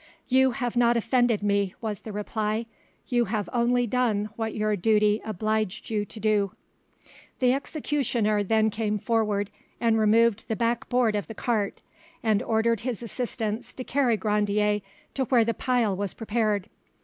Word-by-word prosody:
"You 260 0 +4
have 245 -2 -3
not 240 0 +4
offended 240 -2 +2
me," 200 -2 +1
was 215 -4 -4
the 220 - -8
reply; 215 +2 -2 0.4
"you 240 -1 +2
have 205 -2 -2
only 245 0 +2
done 215 -3 0
what 225 -1 -3
your 215 -1 +1
duty 210 +2 +2
obliged 215 0 -2
you 210 -1 0
to 215 - -9
do." 210 -2 +1 0.8
The 250 -1 +3
executioner 265 -7 0
then 220 +2 +2
came 210 0 -1
forward 210 -2 0 0.3
and 225 -1 +2
removed 220 0 +3
the 220 - -1
back 235 +2 -1
board 245 -4 +2
of 205 - -2
the 225 - -8
cart, 215 -4 -1 0.4
and 215 -3 +2
ordered 230 0 +1
his 240 -1 -4
assistants 230 0 -3
to 255 - -5
carry 255 -4 +1
Grandier 210 0 +1 0.3
to 265 - 0
where 240 -3 +4
the 230 - 0
pile 240 -5 +1
was 200 0 -3
prepared. 215 -3 0
220 Hz, 160 wpm, -26 LUFS, 210-240 Hz, 0.8 s, You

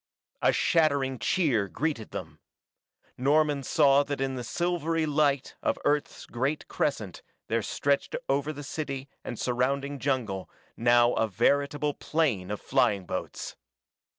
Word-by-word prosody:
A - - +5
shattering 140 -6 +2
cheer 125 - +2
greeted 135 - -2
them. 80 -4 -7 0.8
Norman 145 +1 +3
saw 140 0 +4
that 145 -1 -3
in 135 0 -1
the 125 -1 -4
silvery 165 +3 0
light 145 -2 +1
of - - 0
Earth's 145 0 0
great 135 +5 -2
crescent 105 - -2 0.3
there 115 0 +1
stretched 140 +6 0
over 140 +2 +1
the 145 -1 -8
city 140 -2 -4
and 120 - -5
surrounding 135 +4 -1
jungle 120 -9 -1 0.3
now 120 +1 +4
a 115 - +1
veritable 140 +7 +1
plain 135 - 0
of 105 - -3
flying 120 -8 +1
boats. - - -5
140 Hz, 130 wpm, -28 LUFS, 120-145 Hz, 0.8 s, A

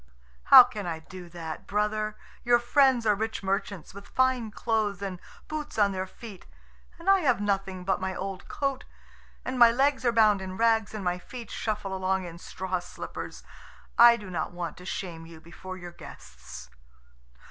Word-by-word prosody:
"How - - +11
can 215 -6 -6
I 165 -2 -2
do 175 +2 -11
that, 165 -2 -7
brother? 215 +1 -1 0.3
Your 240 0 +5
friends 245 0 +3
are 210 - +5
rich 220 0 -3
merchants, 195 -2 -3
with 200 0 -11
fine 260 -3 +1
clothes, 215 -2 -1
and 195 -3 -5 0.3
boots 305 -4 -5
on 205 -2 +4
their 190 0 -3
feet. 205 -1 -12 0.5
And 340 +2 -13
I 390 0 +6
have 260 - +2
nothing 195 -2 -2
but 190 0 0
my 190 0 -2
old 195 0 -5
coat, 275 -1 -2 0.6
and 255 0 -3
my 235 -1 +9
legs 270 +3 +1
are 240 - +3
bound 215 -3 +4
in 185 0 -6
rags 225 -2 +2
and 210 - -5
my 180 0 0
feet 240 +5 -9
shuffle 210 -3 -3
along 190 0 -1
in 170 -1 -9
straw 185 0 -4
slippers. 175 - -8 0.5
I 235 0 +8
do 205 -4 -9
not 165 -3 -3
want 175 -1 -5
to 180 - -12
shame 170 -3 -5
you 165 -1 -12
before 180 +3 -9
your 175 -1 -9
guests." 65 - -12
200 Hz, 180 wpm, -27 LUFS, 185-235 Hz, 0.6 s, How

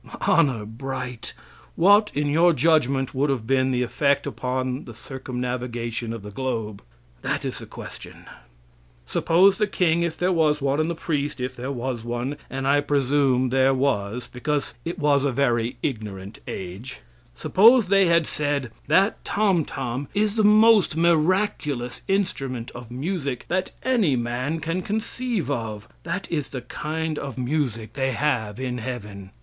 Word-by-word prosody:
Honor 135 - +3
bright, 125 +1 -6 0.4
what, 205 +4 +5
in 145 +1 +1
your 165 +4 +4
judgment, 140 -3 +2
would 140 +3 +1
have 125 -5 -1
been 130 +1 +2
the 125 -1 +1
effect 140 +3 +1
upon 130 0 -3
the 120 - -10
circumnavigation 125 -2 -4
of 115 -3 -6
the 105 - -8
globe? 110 -4 -3 0.4
That - - -2
is - - -3
the - - -9
question. - - -10 0.8
Suppose 185 - +3
the 210 - +2
king, 170 -4 +1
if 170 -1 -1
there 180 +1 +1
was 155 -4 +2
one, 140 +1 0
and 155 +1 +1
the 170 - -2
priest, 150 -3 -2
if 125 +1 -3
there 125 +3 -4
was 125 -2 -3
one 120 +4 -3
and 135 0 -3
I 145 +1 +4
presume 135 -2 +2
there 135 +1 +3
was, 125 -4 0
because 145 +3 -2
it 175 +2 -3
was 145 -4 +3
a 140 - +1
very 120 -2 0
ignorant 105 -6 -4
age 95 - -7 0.3
suppose 225 - +5
they 195 -1 +5
had 170 -1 +4
said: 145 -5 -1 0.2
"That 190 +8 +3
tomtom 145 - 0
is 210 0 +2
the 220 -1 +1
most 215 -3 +6
miraculous 165 -6 +1
instrument 135 -11 -1
of 120 -1 -10
music 140 -1 -3
that 185 +1 0
any 225 - +2
man 125 +7 -2
can 165 +4 -2
conceive 220 - -2
of; 110 -4 -4
that 175 +3 -4
is 150 -4 -1
the 130 - -5
kind 155 +5 -3
of 135 -4 -6
music 125 -5 -2
they 135 -1 0
have 115 -6 -1
in 125 -2 -3
heaven. 105 -5 -6
135 Hz, 155 wpm, -24 LUFS, 125-165 Hz, 0.8 s, most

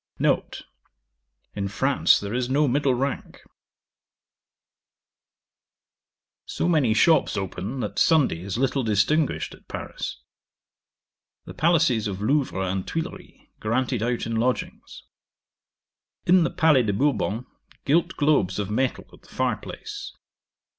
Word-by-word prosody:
'N. - - +3 1.1
In 100 -1 -2
France 135 +7 +3
there 100 +1 -5
is 125 0 -1
no 145 +3 +2
middle 135 0 +2
rank. 135 +2 -4 3.0
'So - - -2
many 145 -10 +3
shops 160 -5 +3
open, 100 +6 -4
that 105 - -3
Sunday 145 - +3
is 95 +2 -4
little 135 +1 +1
distinguished 115 +7 +1
at - - -18
Paris. - - -6 1.3
The - - -9
palaces 155 -10 +2
of 95 -2 -4
Louvre 115 -4 0
and 95 0 -3
Thuilleries 160 0 -6
granted 120 +1 -1
out 120 +1 -1
in 115 0 -2
lodgings. 125 +3 -3 1.2
'In 180 0 +5
the - - 0
Palais 160 -6 +4
de 105 -4 0
Bourbon, 125 -1 0 0.4
gilt 165 +5 +2
globes 145 - +2
of 105 -1 -3
metal 130 +4 -1
at - - -17
the - - -21
fire - - -1
place. 410 -3 -8
125 Hz, 120 wpm, -24 LUFS, 105-150 Hz, 3.0 s, In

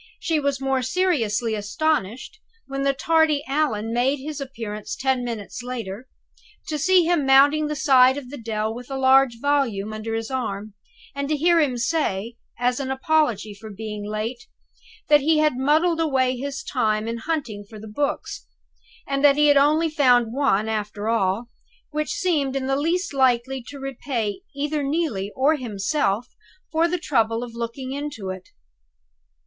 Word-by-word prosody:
She 330 -7 0
was 280 -2 -1
more 270 -1 0
seriously 250 - 0
astonished, 240 - -2 0.3
when 275 0 -4
the 275 0 +3
tardy 310 +1 +2
Allan 260 -6 0
made 255 +4 +2
his 290 +1 -6
appearance 220 -6 -6
ten 265 -2 0
minutes 230 -1 -5
later, 245 -2 -6 0.6
to 305 -1 -2
see 370 +3 +4
him 335 -2 +2
mounting 285 +3 +5
the 300 - -3
side 265 -2 +5
of 260 -3 -8
the 290 - -6
dell, 220 -1 -2
with 245 +2 -9
a 270 - -3
large 265 -2 +4
volume 240 -7 0
under 220 +1 -4
his 225 +2 -4
arm, 215 -5 -3 0.4
and 280 0 -3
to 305 - +1
hear 340 +3 +4
him 275 -6 +1
say, 235 -5 -1 0.2
as 245 +2 0
an 270 -1 -3
apology 265 -7 +1
for 215 +2 -11
being 210 0 -6
late, 215 +4 -4 0.6
that 295 -1 +6
"he 315 +3 +3
had 305 -3 +3
muddled 310 +6 +2
away 260 -5 +1
his 275 +2 -5
time 215 -4 0
in 230 0 -3
hunting 240 -8 -3
for 215 +1 -12
the 220 - -10
Books; 280 +7 -3 0.6
and 275 0 -2
that 285 -1 +6
he 295 0 +5
had 290 - +6
only 305 +4 +4
found 250 -7 +3
one, 250 -6 +1
after 210 -1 -3
all, 225 +1 0 0.4
which 305 0 -2
seemed 290 -7 0
in 270 -1 -1
the 270 0 +1
least 335 +5 -1
likely 260 0 +2
to 285 - -8
repay 260 - -3
either 295 +1 -1
Neelie 275 - -1
or 290 +4 +3
himself 220 -1 -1 0.5
for 325 +2 +3
the 360 +1 -1
trouble 230 -8 0
of 240 -2 -8
looking 235 +3 -5
into 275 -9 -4
it." 185 0 -9
265 Hz, 165 wpm, -23 LUFS, 225-290 Hz, 0.6 s, that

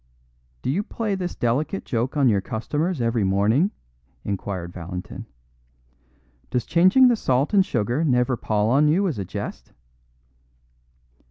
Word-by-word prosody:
"Do - - 0
you 180 +8 0
play 215 0 -3
this 185 -2 -3
delicate 140 +11 -1
joke 125 +4 -2
on 140 -2 +4
your 100 -4 +3
customers 140 - -2
every 115 -2 +1
morning?" 105 - +2 0.5
inquired 95 -3 -4
Valentin. 90 +1 -7 1.2
"Does 125 -3 -1
changing 185 +11 +5
the 245 - +4
salt 135 - 0
and 195 -2 +6
sugar 120 - -1
never 125 -3 +2
pall 110 -1 0
on 145 +4 +4
you 185 +6 +2
as 150 - -3
a 95 - -3
jest?" - - -7
125 Hz, 140 wpm, -23 LUFS, 105-170 Hz, 1.2 s, and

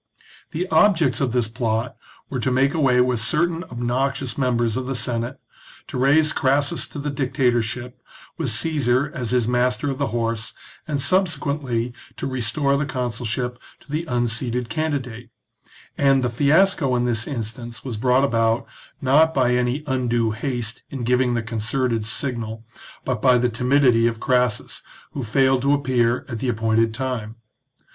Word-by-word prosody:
The 180 +4 -3
objects 170 - +3
of 130 -3 +1
this 120 -2 +1
plot 115 +1 -2 0.3
were 130 - -4
to 125 - 0
make 135 +2 +2
away 135 -6 +3
with 125 -2 +1
certain 165 +9 +1
obnoxious 130 +2 -2
members 120 -4 0
of 130 0 -3
the 135 - -2
Senate, 120 -1 -2 0.5
to - - -9
raise 150 +4 +4
Crassus 145 +5 +1
to - - -10
the 145 0 -3
dictatorship, 125 -2 -1 0.3
with 160 -6 -2
Caesar 140 +2 +1
as 125 -8 -3
his 125 -3 +1
Master 125 +3 +1
of 135 - -6
the - - +1
Horse, 115 -1 -2 0.3
and 150 -3 -1
subsequently 140 -7 0 0.2
to - - -4
restore 135 +3 0
the 140 0 -1
consulship 125 -2 -3 0.2
to 145 - -16
the 155 +3 -2
unseated 120 -2 -1
candidate; 130 -7 -3 0.7
and 135 -2 +4
the 120 - 0
fiasco 145 +1 +3
in 120 0 +1
this 115 -2 -1
instance 115 -2 -6
was 125 -4 -3
brought 125 +4 +2
about, 115 -3 +1 0.4
not 155 +5 +4
by 125 -2 +3
any 125 +4 0
undue 120 -4 0
haste 120 0 -3
in 135 -3 -5
giving 125 0 +2
the 120 - -1
concerted 115 +1 -1
signal, 115 -5 -3 0.4
but 125 -4 -2
by 130 -2 +5
the 125 0 +1
timidity 125 -1 +3
of 115 -1 -2
Crassus, 125 -4 0 0.3
who 140 - -5
failed 130 +2 +2
to 140 +2 +3
appear 125 -3 +1
at 120 -4 -5
the 130 - -1
appointed 115 0 +1
time. 115 -3 -4
125 Hz, 155 wpm, -22 LUFS, 115-140 Hz, 0.7 s, by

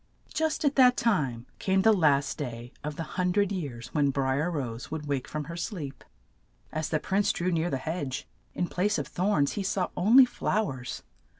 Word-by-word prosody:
Just 315 -1 0
at 285 0 +2
that 250 -1 +6
time 135 - +1
came 190 0 +2
the 220 +1 +6
last 145 -7 +3
day 120 -3 -5
of 150 0 -4
the 165 - -3
hun 180 +3 -1
dred 200 0 +2
years 125 -10 -5
when 145 -2 +3
Bri 135 0 0
er 170 - 0
Rose 125 -8 -4
would 155 -1 -4
wake 140 -3 -2
from 155 -1 -4
her 165 +3 -7
sleep. 165 -5 -5 0.7
As 155 0 -2
the 155 - +1
prince 195 +5 +1
drew 180 +1 -1
near 165 0 +1
the 135 - -1
hedge, 140 -1 -4 0.3
in 180 - 0
place 205 +5 0
of - - -2
thorns 175 -6 +1
he 205 - -3
saw 190 -1 0
on 215 +8 +4
ly 265 - +11
flow 215 - -1
ers. 125 -2 -7
160 Hz, 205 wpm, -28 LUFS, 140-195 Hz, 0.7 s, ly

